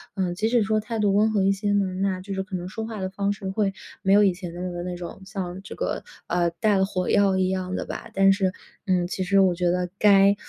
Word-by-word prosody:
嗯， 185 Hz, -3 st, -1 dB
即 215 Hz, +4 st, 0 dB
使 235 Hz, -2 st, +3 dB
说 215 Hz, +1 st, +1 dB
态 220 Hz, +2 st, -4 dB
度 205 Hz, -2 st, +2 dB
温 215 Hz, +2 st, +3 dB
和 205 Hz, -3 st, +2 dB
一 195 Hz, -, +4 dB
些 205 Hz, +1 st, -1 dB
呢， 200 Hz, -1 st, +2 dB, 0.2 s
那 190 Hz, -2 st, 0 dB
就 195 Hz, +1 st, -6 dB
是 190 Hz, -, -1 dB
可 190 Hz, 0 st, -6 dB
能 180 Hz, 0 st, -4 dB
说 220 Hz, +3 st, -5 dB
话 220 Hz, -2 st, -6 dB
的 190 Hz, -, -2 dB
方 200 Hz, +1 st, -1 dB
式 195 Hz, -1 st, -6 dB
会 195 Hz, 0 st, 0 dB, 0.3 s
没 195 Hz, -, +3 dB
有 205 Hz, +1 st, +6 dB
以 195 Hz, -2 st, +4 dB
前 175 Hz, -1 st, -7 dB
的 175 Hz, -, -7 dB
那 180 Hz, 0 st, -3 dB
个 175 Hz, 0 st, -5 dB
那 180 Hz, 0 st, -4 dB
种 175 Hz, +2 st, -8 dB
像 190 Hz, -2 st, -5 dB
这 -, -, -8 dB
个， -, -, -3 dB, 0.2 s
啊， 175 Hz, 0 st, +1 dB
带 195 Hz, +5 st, +1 dB
了 190 Hz, -, +3 dB
火 185 Hz, -2 st, -2 dB
药 200 Hz, -2 st, +3 dB
一 185 Hz, 0 st, +2 dB
样 185 Hz, 0 st, -2 dB
的 -, -, -3 dB
吧， -, -, -7 dB
但 195 Hz, 0 st, +5 dB
是， 190 Hz, -2 st, 0 dB, 0.3 s
嗯， 185 Hz, -2 st, +2 dB
其 190 Hz, +1 st, -3 dB
实 195 Hz, +2 st, +3 dB
我 185 Hz, -2 st, +4 dB
觉 175 Hz, 0 st, +1 dB
得 180 Hz, 0 st, 0 dB
该 200 Hz, -1 st, +6 dB
190 Hz, 300 characters per minute, -24 LUFS, 180-205 Hz, 0.3 s, 有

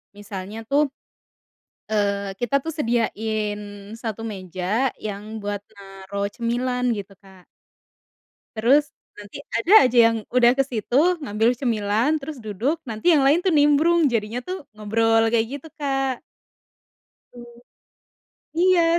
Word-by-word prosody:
misalnya 205 Hz, +1 st, -7 dB
tuh, 285 Hz, +1 st, +3 dB, 1.1 s
eee, 200 Hz, -2 st, 0 dB
kita 245 Hz, +3 st, +1 dB
tuh 325 Hz, -, -3 dB
sediain 220 Hz, -5 st, -1 dB, 0.4 s
1 225 Hz, -1 st, -5 dB
meja 190 Hz, +5 st, -2 dB
yang 215 Hz, +1 st, -6 dB
buat 205 Hz, 0 st, -3 dB
naruh 195 Hz, 0 st, -5 dB
cemilan, 245 Hz, +1 st, -1 dB
gitu, 200 Hz, 0 st, -8 dB
Kak. 190 Hz, -2 st, -18 dB, 1.1 s
Terus 275 Hz, +7 st, +3 dB, 0.3 s
nanti 205 Hz, +3 st, -10 dB
ada 340 Hz, -, +1 dB
aja 250 Hz, -1 st, +1 dB
yang 230 Hz, -, -1 dB
udah 245 Hz, -1 st, +5 dB
kesitu 270 Hz, -, +1 dB
ngambil 225 Hz, -2 st, +1 dB
cemilan, 225 Hz, +1 st, +1 dB
terus 290 Hz, -1 st, -7 dB
duduk, 225 Hz, -, -2 dB
nanti 225 Hz, +10 st, +1 dB
yang 305 Hz, -4 st, +5 dB
lain 305 Hz, +6 st, +4 dB
tuh 375 Hz, -, +2 dB
nimbrung, 305 Hz, +2 st, +4 dB
jadinya 230 Hz, -1 st, -1 dB
tuh 370 Hz, -4 st, -5 dB
ngobrol, 225 Hz, +1 st, +2 dB
kayak 225 Hz, 0 st, +2 dB
gitu, 320 Hz, -, -13 dB
Kak. 270 Hz, -3 st, -2 dB, 1.1 s
Mmm. 240 Hz, 0 st, -12 dB, 1.1 s
Iya. 360 Hz, -3 st, +4 dB
230 Hz, 120 wpm, -23 LUFS, 205-275 Hz, 1.1 s, udah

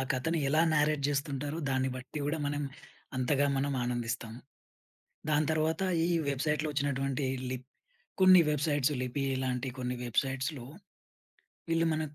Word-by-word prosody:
కథని 160 Hz, +6 st, 0 dB
ఎలా 155 Hz, +3 st, +3 dB
నారేట్ 150 Hz, -1 st, +2 dB
జేస్తుంటారో 145 Hz, +1 st, -2 dB
దాన్ని 130 Hz, 0 st, +1 dB
బట్టి 130 Hz, +4 st, -7 dB
గూడా 150 Hz, +2 st, -1 dB
మనం 145 Hz, 0 st, -1 dB, 0.5 s
అంతగా 140 Hz, +3 st, +2 dB
మనం 140 Hz, +1 st, 0 dB
ఆనందిస్తాం. 120 Hz, -2 st, -3 dB, 1.0 s
దాని 150 Hz, 0 st, +3 dB
తర్వాత 160 Hz, +2 st, 0 dB, 0.2 s
ఈ -, -, 0 dB, 0.2 s
వెబ్సైట్‌లో 150 Hz, +2 st, 0 dB
ఒచ్చినటువంటి 135 Hz, -1 st, -1 dB, 0.3 s
లిప్ 130 Hz, 0 st, -5 dB, 0.5 s
కొన్ని 185 Hz, -1 st, +9 dB
వెబ్సైట్స్ 145 Hz, -1 st, +1 dB
లిపీలాంటి 130 Hz, 0 st, -1 dB
కొన్ని 125 Hz, 0 st, -2 dB
వెబ్సైట్స్‌లో 135 Hz, +2 st, -1 dB, 1.0 s
వీళ్ళు 165 Hz, 0 st, +2 dB
మన 155 Hz, -, -1 dB
140 Hz, 120 wpm, -31 LUFS, 130-150 Hz, 1.0 s, కొన్ని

